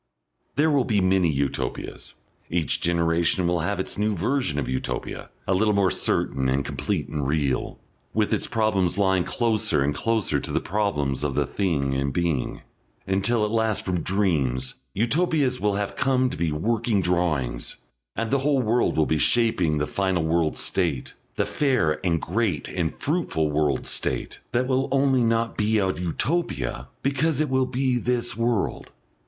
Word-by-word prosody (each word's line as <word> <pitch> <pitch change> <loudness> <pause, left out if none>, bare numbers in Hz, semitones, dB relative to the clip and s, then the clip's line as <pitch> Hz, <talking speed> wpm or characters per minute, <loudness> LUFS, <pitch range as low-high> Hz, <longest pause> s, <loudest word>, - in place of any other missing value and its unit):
There 155 +2 +3
will 140 -3 +3
be 110 -4 +1
many 95 -2 +3
Utopias. 70 -2 -3 0.3
Each 85 -3 0
generation 85 +1 +1
will 85 0 +1
have 100 +5 -1
its 95 - -3
new 105 0 +1
version 105 - 0
of 75 - -1
Utopia, 65 0 -4 0.2
a 95 - +2
little 105 +2 +2
more 95 -2 +3
certain 65 -1 0
and 70 +1 0
complete - - -2
and 75 -3 -3
real, 70 -3 -1 0.3
with 110 -1 +1
its - - 0
problems 100 -5 +1
lying 95 -2 +3
closer 110 - +1
and 75 +1 0
closer 110 +8 0
to - - -5
the - - +1
problems 75 -10 -1
of 70 -2 -1
the 75 - +2
Thing 70 -6 -1
in 70 +1 0
Being. 80 -2 -1 0.4
Until 100 +4 +1
at 105 - -3
last 110 -2 0
from 90 -2 -1
dreams 75 -11 0 0.2
Utopias 135 - +1
will 105 -1 +1
have 100 0 -2
come 130 +1 +2
to - - -5
be 85 -2 0
working 110 +5 0
drawings, 85 -8 -1 0.4
and 115 -1 -2
the 140 - +3
whole 140 0 +2
world 120 -3 +1
will 80 - +4
be 80 0 0
shaping 95 -10 +2
the 75 - 0
final 95 -2 0
World 80 -1 +1
State, 65 - -1 0.2
the 100 - +1
fair 105 - +1
and 85 -3 +1
great 95 - -1
and 85 -3 -1
fruitful 130 - -1
World 75 -3 0
State, - - -1
that 125 +2 +1
will 130 0 +1
only 135 -2 +3
not 115 0 0
be 110 +1 +2
a 95 -2 +1
Utopia 90 - -2 0.2
because 140 +2 +1
it 155 -2 +1
will 130 -1 +2
be 125 -1 0
this 120 -1 0
world. 115 -2 -1
95 Hz, 170 wpm, -24 LUFS, 80-120 Hz, 0.4 s, will